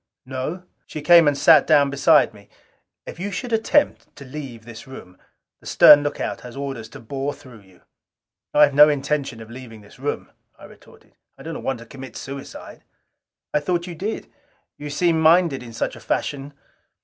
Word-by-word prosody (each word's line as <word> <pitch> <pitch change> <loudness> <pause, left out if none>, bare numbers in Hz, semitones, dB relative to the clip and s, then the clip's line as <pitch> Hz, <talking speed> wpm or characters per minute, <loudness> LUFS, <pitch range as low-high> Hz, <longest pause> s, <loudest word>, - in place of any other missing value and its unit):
"No." 135 +8 -5 0.2
She 155 - -7
came 170 -1 +6
and 145 -1 +2
sat - - +5
down 145 -3 +4
beside 140 -2 +3
me. 100 -1 -18 0.6
"If - - -10
you 195 +3 -3
should 235 +5 -5
attempt 225 +6 0
to 140 - -12
leave 130 -5 -9
this 115 +2 -11
room, 95 -9 -12 0.4
the - - -15
stern 145 -1 +8
lookout 120 -5 -4
has 125 +2 -11
orders 135 -6 -6
to - - -12
bore 135 +5 -4
you - - -18
through." 100 -8 -17 0.7
"I 150 - +5
have 145 -1 +4
no 150 +2 +7
intention 140 -4 -2
of 110 - -15
leaving 120 -3 -11
this 105 +3 -18
room," 145 +2 -4 0.3
I - - -14
retorted. - - -19 0.2
"I - - -13
do - - -6
not - - -7
want 135 -2 -2
to - - -11
commit 135 +2 -11
suicide." 135 0 -9 0.7
"I - - +3
thought 170 +3 -2
you 180 - -7
did. 200 +7 -6 0.4
You 145 0 -8
seem 165 +2 +1
minded 160 -3 +4
in 120 -2 -10
such 115 - -3
a - - -12
fashion. 140 +1 -3
140 Hz, 185 wpm, -22 LUFS, 125-155 Hz, 0.7 s, stern